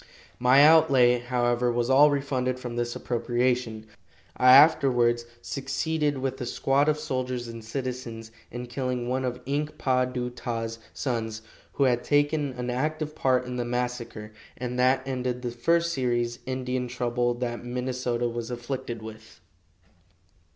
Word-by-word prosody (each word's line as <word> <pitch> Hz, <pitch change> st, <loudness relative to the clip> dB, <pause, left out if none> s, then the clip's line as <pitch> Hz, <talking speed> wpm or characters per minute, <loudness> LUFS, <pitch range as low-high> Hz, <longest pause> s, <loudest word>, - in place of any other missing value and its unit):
My 130 Hz, +3 st, +6 dB
outlay, 135 Hz, -6 st, +5 dB
however, 120 Hz, 0 st, 0 dB
was 120 Hz, 0 st, 0 dB
all 140 Hz, +3 st, +6 dB
refunded 130 Hz, -3 st, -1 dB
from 120 Hz, -2 st, -6 dB
this 120 Hz, 0 st, -2 dB
appropriation. 120 Hz, -2 st, -1 dB, 0.5 s
I 125 Hz, 0 st, +6 dB
afterwards 130 Hz, -5 st, +5 dB, 0.2 s
succeeded, 145 Hz, +2 st, -1 dB
with 130 Hz, 0 st, -3 dB
a -, -, -2 dB
squad 140 Hz, +4 st, +2 dB
of 150 Hz, -, +1 dB
soldiers 130 Hz, -5 st, -3 dB
and 115 Hz, -1 st, -8 dB
citizens, 115 Hz, -2 st, -5 dB, 0.2 s
in 120 Hz, +1 st, -6 dB
killing 125 Hz, -1 st, -3 dB
one 130 Hz, +1 st, -1 dB
of 125 Hz, -1 st, -3 dB
Ink 150 Hz, +3 st, -2 dB
pa 130 Hz, -1 st, +2 dB
du 125 Hz, -1 st, -4 dB
ta's 115 Hz, -2 st, -4 dB
sons, 110 Hz, -4 st, -3 dB, 0.3 s
who 140 Hz, -, +1 dB
had 125 Hz, -2 st, +2 dB
taken 145 Hz, 0 st, +1 dB
an 125 Hz, 0 st, -4 dB
active 155 Hz, +4 st, -2 dB
part 130 Hz, -3 st, +1 dB
in 125 Hz, 0 st, -5 dB
the 120 Hz, -, -1 dB
massacre, 120 Hz, -3 st, -4 dB, 0.3 s
and 125 Hz, 0 st, -4 dB
that 130 Hz, +1 st, +2 dB
ended 125 Hz, -1 st, -3 dB
the 120 Hz, -, -2 dB
first 170 Hz, +8 st, +1 dB
serious 120 Hz, -3 st, -1 dB
Indian 130 Hz, -1 st, -2 dB
trouble 120 Hz, 0 st, -1 dB
that 120 Hz, -1 st, -4 dB
Minnesota 125 Hz, -1 st, -2 dB
was 115 Hz, -1 st, -4 dB
afflicted 120 Hz, -2 st, -5 dB
with. 110 Hz, 0 st, -11 dB
125 Hz, 145 wpm, -26 LUFS, 120-130 Hz, 0.5 s, My